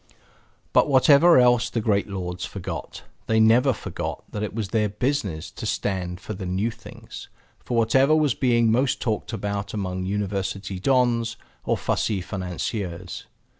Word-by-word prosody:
But -, -, +4 dB
whatever 145 Hz, +5 st, +6 dB
else 125 Hz, -1 st, +4 dB
the 120 Hz, -, -2 dB
great 105 Hz, -2 st, +1 dB
lords 90 Hz, -2 st, -4 dB
forgot 95 Hz, -3 st, -6 dB, 0.2 s
they 110 Hz, 0 st, +2 dB
never 120 Hz, +5 st, +5 dB
forgot 115 Hz, -, -5 dB
that 105 Hz, -, -4 dB
it 105 Hz, 0 st, -4 dB
was 110 Hz, -4 st, -3 dB
their 105 Hz, 0 st, +1 dB
business 105 Hz, -, -2 dB
to 110 Hz, -, -6 dB
stand 95 Hz, -3 st, -2 dB
for 110 Hz, -, -6 dB
the 95 Hz, -1 st, -6 dB
new 95 Hz, +6 st, 0 dB
things, -, -, -11 dB, 0.3 s
for 120 Hz, -, -3 dB
whatever 135 Hz, +6 st, +4 dB
was 150 Hz, -5 st, +3 dB
being 120 Hz, -3 st, +2 dB
most 125 Hz, +3 st, +1 dB
talked 110 Hz, -1 st, -2 dB
about 100 Hz, -1 st, -3 dB
among 95 Hz, -2 st, -3 dB
university 100 Hz, -1 st, -3 dB
dons 120 Hz, -1 st, +1 dB, 0.3 s
or -, -, +1 dB
fussy 105 Hz, -3 st, -1 dB
financiers. 90 Hz, -1 st, -5 dB
105 Hz, 150 wpm, -24 LUFS, 95-120 Hz, 0.3 s, whatever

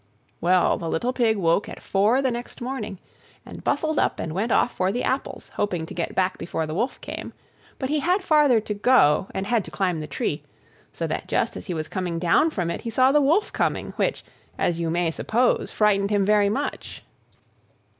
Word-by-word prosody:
Well, 180 Hz, +1 st, +3 dB
the 165 Hz, -, -4 dB
little 245 Hz, +12 st, -1 dB
Pig 230 Hz, -4 st, +2 dB
woke 170 Hz, +1 st, +1 dB
at -, -, -8 dB
four 215 Hz, +7 st, +2 dB
the 260 Hz, -, +2 dB
next 240 Hz, +1 st, -6 dB
morning, 240 Hz, -6 st, -4 dB, 0.5 s
and -, -, -10 dB
bustled 310 Hz, +1 st, 0 dB
up, -, -, 0 dB
and 160 Hz, -, -4 dB
went 215 Hz, +6 st, -1 dB
off 245 Hz, -, +3 dB
for 185 Hz, +1 st, +1 dB
the 245 Hz, +4 st, -2 dB
apples, 265 Hz, +2 st, -3 dB
hoping 180 Hz, -6 st, -1 dB
to -, -, -9 dB
get 170 Hz, -, -3 dB
back 185 Hz, 0 st, 0 dB
before 160 Hz, -2 st, -3 dB
the 155 Hz, -, -5 dB
Wolf 240 Hz, +10 st, -2 dB
came; -, -, -7 dB, 0.4 s
but 260 Hz, -, -3 dB
he 300 Hz, +1 st, +1 dB
had 365 Hz, +6 st, +1 dB
farther 295 Hz, -8 st, +4 dB
to 210 Hz, -, -4 dB
go, 200 Hz, -, +4 dB
and 190 Hz, -, -2 dB
had 225 Hz, 0 st, +1 dB
to -, -, -8 dB
climb 180 Hz, -4 st, -1 dB
the 155 Hz, -, -5 dB
tree, 140 Hz, -, -2 dB, 0.5 s
so -, -, -4 dB
that -, -, -3 dB
just -, -, 0 dB
as 90 Hz, -, -8 dB
he 175 Hz, -, -3 dB
was 155 Hz, -1 st, -3 dB
coming 180 Hz, -3 st, -3 dB
down 175 Hz, -, +3 dB
from 180 Hz, -, -2 dB
it, -, -, -5 dB
he 230 Hz, -, -4 dB
saw 255 Hz, +4 st, +4 dB
the 295 Hz, +1 st, +4 dB
Wolf 320 Hz, +10 st, +2 dB
coming, -, -, -1 dB
which, -, -, -1 dB, 0.3 s
as 170 Hz, -1 st, 0 dB
you 165 Hz, -1 st, -1 dB
may 170 Hz, 0 st, +1 dB
suppose, 240 Hz, +8 st, +1 dB
frightened 200 Hz, -2 st, +2 dB
him 205 Hz, -2 st, +2 dB
very 205 Hz, 0 st, +4 dB
much. 275 Hz, +8 st, -4 dB
205 Hz, 210 wpm, -24 LUFS, 175-255 Hz, 0.5 s, farther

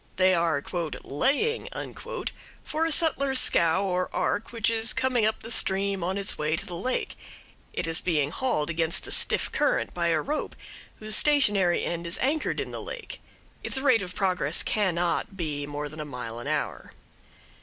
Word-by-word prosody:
They 185 Hz, 0 st, +4 dB
are 165 Hz, -5 st, +1 dB, 0.4 s
"laying" 285 Hz, -, 0 dB, 1.0 s
for 315 Hz, +1 st, -1 dB
a -, -, -2 dB
settler's 280 Hz, -4 st, +3 dB
scow 170 Hz, -5 st, +3 dB
or 180 Hz, -1 st, 0 dB
ark 205 Hz, -, -1 dB
which 230 Hz, -1 st, +1 dB
is 225 Hz, 0 st, +3 dB
coming 250 Hz, -4 st, +2 dB
up 220 Hz, -, -2 dB
the 230 Hz, -, -7 dB
stream 195 Hz, -3 st, +1 dB
on 185 Hz, +3 st, -1 dB
its 200 Hz, 0 st, -1 dB
way 150 Hz, +1 st, +1 dB
to 170 Hz, -, -5 dB
the 180 Hz, -, -6 dB
lake; 250 Hz, +9 st, -2 dB, 0.6 s
it -, -, -2 dB
is 165 Hz, 0 st, +1 dB
being 150 Hz, -5 st, +1 dB
hauled 170 Hz, -10 st, 0 dB
against 165 Hz, +1 st, 0 dB
the -, -, -7 dB
stiff -, -, +1 dB
current -, -, +1 dB
by 170 Hz, -1 st, 0 dB
a 165 Hz, -2 st, +3 dB
rope 300 Hz, -, -3 dB, 0.4 s
whose 215 Hz, 0 st, +1 dB
stationary 205 Hz, -12 st, +3 dB
end 170 Hz, 0 st, -3 dB
is 170 Hz, -, +1 dB
anchored 295 Hz, +4 st, 0 dB
in -, -, -3 dB
the -, -, -5 dB
lake; -, -, -7 dB, 0.4 s
its -, -, +1 dB
rate 265 Hz, -5 st, +4 dB
of 185 Hz, -1 st, -6 dB
progress 180 Hz, -6 st, +1 dB
cannot 185 Hz, -1 st, 0 dB
be 145 Hz, -5 st, -3 dB
more 145 Hz, 0 st, -4 dB
than 155 Hz, +2 st, -10 dB
a -, -, -2 dB
mile 125 Hz, -4 st, -6 dB
an 120 Hz, -, -7 dB
hour. -, -, -3 dB
185 Hz, 175 wpm, -27 LUFS, 165-230 Hz, 1.0 s, They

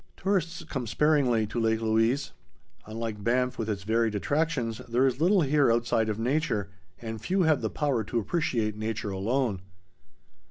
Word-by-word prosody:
Tourists 180 Hz, -3 st, -1 dB
come 130 Hz, -6 st, -4 dB
sparingly 130 Hz, -4 st, +2 dB
to 110 Hz, +3 st, -4 dB
Lake 110 Hz, -1 st, +1 dB
Louise. 115 Hz, +5 st, +1 dB, 0.6 s
Unlike 110 Hz, -1 st, -5 dB
Banff 125 Hz, +2 st, +1 dB
with 110 Hz, -1 st, -2 dB
its 100 Hz, -2 st, -3 dB
varied 110 Hz, +1 st, +1 dB
attractions, 130 Hz, -2 st, -1 dB
there 125 Hz, +3 st, +3 dB
is 130 Hz, +2 st, 0 dB
little 185 Hz, +3 st, +4 dB
here 140 Hz, -3 st, +3 dB
outside 115 Hz, -1 st, +1 dB
of 105 Hz, -, -2 dB
nature, 115 Hz, -5 st, -1 dB, 0.3 s
and 110 Hz, -2 st, -6 dB
few 185 Hz, -, +1 dB
have 160 Hz, -2 st, +3 dB
the -, -, -1 dB
power 140 Hz, -7 st, 0 dB
to 120 Hz, -, -3 dB
appreciate 115 Hz, -, 0 dB
nature 110 Hz, -1 st, -3 dB
alone. 105 Hz, +1 st, -1 dB
115 Hz, 160 wpm, -27 LUFS, 110-145 Hz, 0.6 s, little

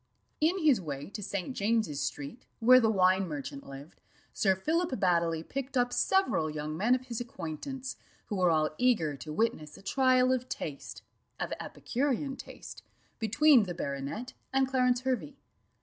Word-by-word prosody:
In 325 Hz, +5 st, +2 dB
his 300 Hz, -, +4 dB
way 145 Hz, +1 st, -6 dB
to 210 Hz, -, -6 dB
St. 200 Hz, +5 st, -4 dB
James's 205 Hz, -9 st, 0 dB
street, 145 Hz, -, -5 dB
where 250 Hz, +2 st, +7 dB
the 225 Hz, -3 st, +3 dB
wine 190 Hz, -2 st, +3 dB
merchant 140 Hz, -3 st, -6 dB
lived, 140 Hz, +4 st, -11 dB, 0.3 s
Sir 190 Hz, -2 st, +2 dB
Philip 330 Hz, -, 0 dB
Baddely 170 Hz, -4 st, +2 dB
picked 270 Hz, 0 st, -3 dB
up 245 Hz, 0 st, +2 dB
several 380 Hz, -, +2 dB
young 155 Hz, 0 st, -4 dB
men 220 Hz, +9 st, +3 dB
of 255 Hz, 0 st, -5 dB
his 240 Hz, -2 st, -4 dB
acquaintance, 245 Hz, -, -6 dB, 0.3 s
who 205 Hz, -, -4 dB
were 180 Hz, -1 st, +4 dB
all 155 Hz, -2 st, +2 dB
eager 210 Hz, -, +2 dB
to 135 Hz, +4 st, -8 dB
witness 155 Hz, -5 st, -1 dB
a -, -, -15 dB
trial 255 Hz, +2 st, +3 dB
of 255 Hz, 0 st, -2 dB
taste, 145 Hz, -3 st, -6 dB, 0.4 s
of -, -, -2 dB
epicurean 270 Hz, +1 st, -2 dB
taste, -, -, -10 dB, 0.4 s
between 240 Hz, +2 st, +5 dB
the 175 Hz, -2 st, -5 dB
baronet 140 Hz, -, -4 dB, 0.2 s
and 270 Hz, 0 st, +2 dB
Clarence 250 Hz, -2 st, +2 dB
Hervey. 260 Hz, +2 st, -2 dB
220 Hz, 160 wpm, -30 LUFS, 160-255 Hz, 0.4 s, where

